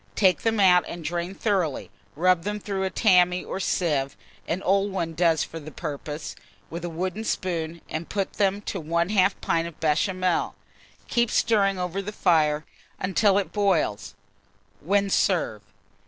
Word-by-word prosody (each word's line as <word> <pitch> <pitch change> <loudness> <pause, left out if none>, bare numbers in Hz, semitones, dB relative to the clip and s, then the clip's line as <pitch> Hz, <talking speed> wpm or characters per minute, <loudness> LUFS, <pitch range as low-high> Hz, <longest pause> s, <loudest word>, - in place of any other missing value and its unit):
Take 190 -3 +3
them 225 -1 0
out 180 -2 +6
and 170 -1 -7
drain 175 +4 -3
thoroughly; 190 - -1 0.2
rub 180 +2 +3
them 210 +3 -3
through 195 -2 -3
a - - 0
tammy 180 -1 +3
or - - -4
sieve 150 -7 0 0.3
(an 180 +4 -2
old 195 +1 +2
one 170 -4 -2
does 165 -2 +2
for 165 - -7
the 155 0 -9
purpose) 150 -1 -6 0.4
with 170 +1 -6
a 175 - -3
wooden 185 +5 -3
spoon, 170 -5 -3
and 160 +1 -5
put 195 -2 -2
them 200 0 +1
to 195 -3 -4
1/2 175 +5 +2
pint 165 0 0
of 170 - -11
Béchamel; 180 +3 0 0.5
keep 235 -2 +1
stirring 200 -4 +2
over 180 +1 -2
the 200 +2 -5
fire 155 -6 +2 0.3
until 195 +2 +2
it 200 - -1
boils, 190 - 0 0.6
when 200 +4 +1
serve. 165 - +1
180 Hz, 155 wpm, -25 LUFS, 165-195 Hz, 0.6 s, out